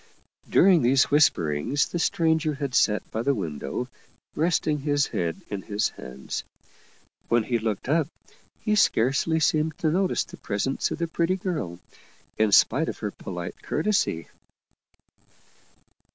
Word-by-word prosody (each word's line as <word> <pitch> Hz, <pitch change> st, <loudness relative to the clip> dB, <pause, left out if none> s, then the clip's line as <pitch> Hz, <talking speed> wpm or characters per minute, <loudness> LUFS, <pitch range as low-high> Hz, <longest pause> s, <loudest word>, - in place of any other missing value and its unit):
During 180 Hz, -3 st, +5 dB
these 135 Hz, +3 st, +3 dB
whisperings 135 Hz, -, +2 dB
the 175 Hz, -, -3 dB
stranger 160 Hz, -2 st, +1 dB
had 140 Hz, -2 st, -4 dB
sat 105 Hz, -3 st, +2 dB
by 110 Hz, -, -2 dB
the 140 Hz, +3 st, +1 dB
window, 85 Hz, -, -4 dB, 0.5 s
resting 160 Hz, -2 st, +1 dB
his 145 Hz, 0 st, +1 dB
head 85 Hz, -1 st, -3 dB
in 100 Hz, -2 st, -3 dB
his 105 Hz, +2 st, -1 dB
hands. 65 Hz, +1 st, -7 dB, 0.8 s
When 120 Hz, -1 st, +2 dB
he 120 Hz, +1 st, 0 dB
looked 110 Hz, -1 st, -3 dB
up, 155 Hz, +1 st, +2 dB, 0.5 s
he 215 Hz, -, 0 dB
scarcely 150 Hz, -, +2 dB
seemed 155 Hz, 0 st, +1 dB
to 155 Hz, -, 0 dB
notice 185 Hz, +2 st, +1 dB
the 180 Hz, -, -13 dB
presence 110 Hz, +3 st, -1 dB
of -, -, -4 dB
the 170 Hz, 0 st, -1 dB
pretty 170 Hz, +2 st, 0 dB
girl, 170 Hz, -, -4 dB, 0.6 s
in 110 Hz, -1 st, +2 dB
spite 140 Hz, +10 st, +4 dB
of -, -, -5 dB
her 105 Hz, -2 st, -4 dB
polite 90 Hz, -3 st, -7 dB
cour 155 Hz, -, -2 dB
tesy. 200 Hz, -, +1 dB
140 Hz, 140 wpm, -25 LUFS, 105-160 Hz, 0.8 s, During